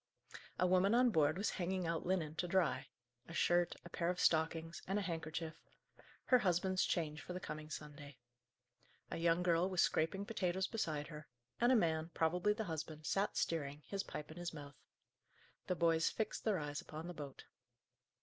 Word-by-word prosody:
A -, -, +3 dB
woman 185 Hz, +4 st, +4 dB
on 250 Hz, 0 st, +5 dB
board 155 Hz, -2 st, +3 dB
was 200 Hz, -, 0 dB
hanging 185 Hz, 0 st, -1 dB
out 165 Hz, 0 st, -1 dB
linen 170 Hz, -5 st, 0 dB
to 180 Hz, -, 0 dB
dry 175 Hz, -6 st, +1 dB, 0.4 s
a 165 Hz, -, -8 dB
shirt, 175 Hz, 0 st, +3 dB
a -, -, -8 dB
pair 170 Hz, 0 st, 0 dB
of 180 Hz, -, -1 dB
stockings, 165 Hz, +1 st, +1 dB
and 195 Hz, +2 st, +1 dB
a 205 Hz, -, 0 dB
handkerchief 160 Hz, -2 st, -3 dB, 0.7 s
her 250 Hz, -, +5 dB
husband's 185 Hz, -2 st, +2 dB
change 155 Hz, -3 st, -1 dB
for 180 Hz, -, -6 dB
the 180 Hz, -, -3 dB
coming 155 Hz, -3 st, -6 dB
Sunday. 145 Hz, -3 st, -8 dB, 0.9 s
A -, -, -2 dB
young 170 Hz, +1 st, +3 dB
girl 175 Hz, +1 st, +3 dB
was 185 Hz, -2 st, +3 dB
scraping 175 Hz, +5 st, +1 dB
potatoes 190 Hz, -3 st, 0 dB
beside 155 Hz, -9 st, -2 dB
her; 150 Hz, -2 st, -9 dB, 0.3 s
and 240 Hz, +2 st, +5 dB
a -, -, +6 dB
man, 160 Hz, -6 st, +2 dB
probably 175 Hz, +5 st, +2 dB
the 220 Hz, +1 st, -3 dB
husband, 155 Hz, -3 st, -5 dB
sat 195 Hz, +5 st, 0 dB
steering, 150 Hz, -2 st, -1 dB
his 200 Hz, -1 st, -2 dB
pipe 150 Hz, -5 st, -7 dB
in 160 Hz, -, -10 dB
his 175 Hz, -1 st, -4 dB
mouth. 145 Hz, -2 st, -10 dB, 0.9 s
The 180 Hz, -, +1 dB
boys 165 Hz, -1 st, +3 dB
fixed 220 Hz, -1 st, -3 dB
their 215 Hz, -4 st, +3 dB
eyes 145 Hz, -2 st, -3 dB
upon 155 Hz, +2 st, -7 dB
the 175 Hz, -, -5 dB
boat. 145 Hz, -4 st, -8 dB
170 Hz, 180 wpm, -38 LUFS, 155-185 Hz, 0.9 s, a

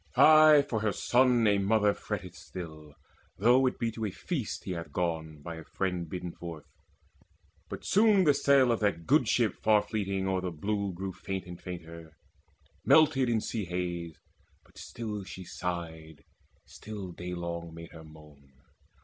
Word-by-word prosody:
Ay, 155 Hz, -2 st, +7 dB
for 110 Hz, -, -1 dB
her 105 Hz, -1 st, 0 dB
son 125 Hz, +1 st, +3 dB
a 100 Hz, -1 st, +3 dB
mother 105 Hz, +1 st, +3 dB
fretteth -, -, -6 dB
still, 80 Hz, -5 st, -10 dB, 0.4 s
Though 125 Hz, +6 st, +4 dB
it 125 Hz, -, -2 dB
be 115 Hz, -1 st, -1 dB
to 115 Hz, 0 st, -6 dB
a -, -, -1 dB
feast 130 Hz, -, -4 dB
that -, -, -23 dB
he 95 Hz, -, -4 dB
hath 85 Hz, -2 st, -5 dB
gone, 80 Hz, -4 st, -3 dB
By 85 Hz, 0 st, -6 dB
a 80 Hz, -, -9 dB
friend 90 Hz, -2 st, -3 dB
bidden 90 Hz, 0 st, -5 dB
forth. 85 Hz, -4 st, -9 dB, 1.0 s
But -, -, -7 dB
soon 205 Hz, -1 st, +4 dB
the 150 Hz, -4 st, +5 dB
sail 140 Hz, -2 st, +4 dB
Of 115 Hz, -, 0 dB
that 100 Hz, -6 st, -1 dB
good -, -, +3 dB
ship -, -, +2 dB
far 105 Hz, -1 st, +4 dB
fleeting 100 Hz, -3 st, -2 dB
o'er 95 Hz, -1 st, 0 dB
the 90 Hz, -, -2 dB
blue 100 Hz, +4 st, -2 dB
Grew 95 Hz, +2 st, -5 dB
faint 95 Hz, +1 st, -5 dB
and 90 Hz, -1 st, -10 dB
fainter 85 Hz, -3 st, -9 dB, 0.7 s
melted 145 Hz, -5 st, +4 dB
in 115 Hz, -2 st, +1 dB
sea 110 Hz, -2 st, -3 dB
haze. 85 Hz, -2 st, -4 dB, 0.5 s
But -, -, -17 dB
still 105 Hz, -3 st, -6 dB
she 95 Hz, 0 st, -9 dB
sighed, 80 Hz, -4 st, -6 dB, 0.4 s
still 105 Hz, -4 st, -8 dB
daylong 85 Hz, -1 st, -6 dB
made 85 Hz, 0 st, -10 dB
her 80 Hz, -1 st, -11 dB
moan. 75 Hz, -3 st, -17 dB
95 Hz, 165 wpm, -29 LUFS, 85-110 Hz, 1.0 s, Ay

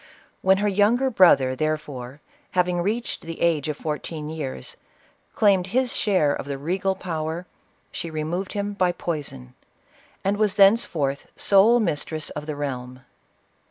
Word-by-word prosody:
When 190 Hz, 0 st, +4 dB
her 205 Hz, +1 st, 0 dB
younger 215 Hz, +7 st, +2 dB
brother, 140 Hz, -, +5 dB
therefore, 150 Hz, -3 st, -4 dB, 0.4 s
having 180 Hz, -1 st, +2 dB
reached 220 Hz, +6 st, -2 dB
the 165 Hz, 0 st, -8 dB
age 160 Hz, -3 st, +1 dB
of 150 Hz, -, -3 dB
fourteen 155 Hz, 0 st, -5 dB
years, 135 Hz, -, -6 dB, 0.6 s
claimed 195 Hz, -4 st, +3 dB
his 250 Hz, +4 st, 0 dB
share 185 Hz, -9 st, +2 dB
of 140 Hz, -, -5 dB
the 140 Hz, -1 st, -3 dB
regal 185 Hz, +6 st, -1 dB
power, 165 Hz, -1 st, -4 dB, 0.5 s
she 170 Hz, -, -4 dB
removed 160 Hz, +5 st, -3 dB
him 205 Hz, 0 st, -2 dB
by 185 Hz, -3 st, +1 dB
poison, 145 Hz, -, -5 dB, 0.7 s
and 200 Hz, +1 st, +1 dB
was 210 Hz, -1 st, +2 dB
thence 205 Hz, +4 st, +6 dB
forth 140 Hz, -3 st, -2 dB
sole 210 Hz, +5 st, +5 dB
mistress 155 Hz, -5 st, -2 dB
of 150 Hz, +1 st, -7 dB
the 155 Hz, -, -3 dB
realm. 130 Hz, -3 st, -5 dB
170 Hz, 145 wpm, -24 LUFS, 150-195 Hz, 0.7 s, thence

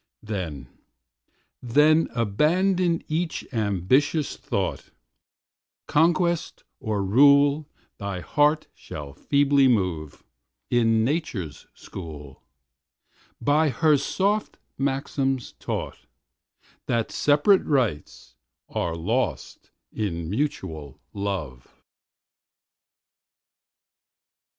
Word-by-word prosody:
Then, 90 Hz, -10 st, -5 dB, 0.9 s
then, 150 Hz, +6 st, +4 dB
abandon 170 Hz, -, +1 dB
each 160 Hz, +2 st, -2 dB
ambitious 115 Hz, -, +1 dB
thought, -, -, -3 dB, 1.0 s
Conquest 170 Hz, +1 st, +1 dB, 0.2 s
or 105 Hz, -2 st, -2 dB
rule 140 Hz, +6 st, +5 dB, 0.3 s
thy 100 Hz, -2 st, -4 dB
heart 150 Hz, -, +2 dB
shall 70 Hz, -2 st, -9 dB
feebly 140 Hz, -, +3 dB
move, 90 Hz, -, -1 dB, 0.5 s
In 115 Hz, -2 st, +3 dB
Nature's 130 Hz, -, -3 dB
school, 75 Hz, -6 st, -10 dB, 1.0 s
by 150 Hz, +2 st, +3 dB
her 150 Hz, +4 st, +3 dB
soft 200 Hz, +9 st, -1 dB, 0.2 s
maxims 135 Hz, -2 st, -1 dB
taught, -, -, -5 dB, 0.8 s
That 115 Hz, -2 st, 0 dB
separate 150 Hz, +7 st, +3 dB
rights 120 Hz, -, -2 dB, 0.3 s
are 85 Hz, -1 st, -2 dB
lost 110 Hz, +11 st, -2 dB, 0.2 s
in 85 Hz, -6 st, -3 dB
mutual 85 Hz, -, -3 dB
love. 95 Hz, -12 st, -5 dB
130 Hz, 75 wpm, -25 LUFS, 95-150 Hz, 1.0 s, rule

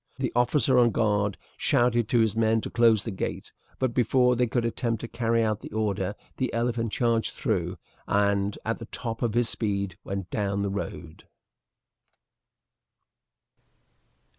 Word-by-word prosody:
The -, -, -2 dB
officer 125 Hz, +1 st, +3 dB
on 120 Hz, -1 st, +5 dB
guard 105 Hz, -3 st, +1 dB, 0.2 s
shouted 120 Hz, -2 st, +2 dB
to 120 Hz, -2 st, +4 dB
his 110 Hz, -2 st, +1 dB
men 110 Hz, 0 st, +3 dB
to -, -, -6 dB
close 115 Hz, -3 st, +4 dB
the 115 Hz, -, -4 dB
gate, 95 Hz, -, -5 dB, 0.2 s
but 130 Hz, -2 st, 0 dB
before 125 Hz, +1 st, +3 dB
they 125 Hz, 0 st, +2 dB
could 115 Hz, +1 st, 0 dB
attempt 115 Hz, -1 st, -1 dB
to 120 Hz, -, -5 dB
carry 115 Hz, -1 st, +1 dB
out 110 Hz, -2 st, 0 dB
the -, -, -10 dB
order 105 Hz, -2 st, -1 dB, 0.2 s
the 130 Hz, -, -1 dB
elephant 115 Hz, -1 st, 0 dB
charged 115 Hz, -1 st, 0 dB
through, 90 Hz, -7 st, -1 dB, 0.3 s
and 100 Hz, 0 st, +1 dB
at 115 Hz, +1 st, -1 dB
the 115 Hz, -, -7 dB
top 115 Hz, -2 st, -5 dB
of 115 Hz, -3 st, 0 dB
his 120 Hz, -1 st, +3 dB
speed 100 Hz, -3 st, -2 dB
went 95 Hz, -2 st, -5 dB
down 100 Hz, -1 st, -1 dB
the 100 Hz, -, -1 dB
road. 85 Hz, -5 st, -6 dB
115 Hz, 155 wpm, -27 LUFS, 100-120 Hz, 0.3 s, on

